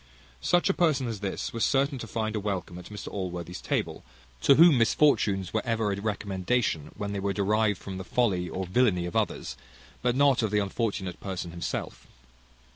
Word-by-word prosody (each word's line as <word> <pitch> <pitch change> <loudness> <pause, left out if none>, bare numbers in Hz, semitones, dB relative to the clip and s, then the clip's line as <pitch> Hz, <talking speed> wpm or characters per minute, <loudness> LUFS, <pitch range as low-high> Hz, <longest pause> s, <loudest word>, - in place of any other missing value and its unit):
Such 175 - +3
a 195 - +3
person 150 -8 +2
as 115 -3 -4
this 100 -1 -4
was 115 - -1
certain 135 0 +2
to 115 - -6
find 110 0 -2
a - - 0
welcome 95 -3 -4
at 90 - -11
Mr 105 +1 -8
Allworthy's 90 -2 -5
table, - - -2 0.4
to 140 - +6
whom 160 -4 +7
misfortunes 110 - +2
were 110 - +1
ever 115 -3 0
a 100 - -5
recommendation, 100 -4 -1
when 105 -1 -3
they 100 - -2
were 100 0 -1
derived 105 +1 +1
from 95 -1 -7
the - - -5
folly 95 -5 0
or 95 +3 -3
villany 90 -2 +2
of 90 - -6
others, - - -1 0.5
and 125 0 +1
not 140 -3 +4
of 110 - 0
the 105 - +1
unfortunate 100 -2 -2
person 95 -3 -5
himself. 85 0 -5
105 Hz, 190 wpm, -28 LUFS, 95-120 Hz, 0.5 s, whom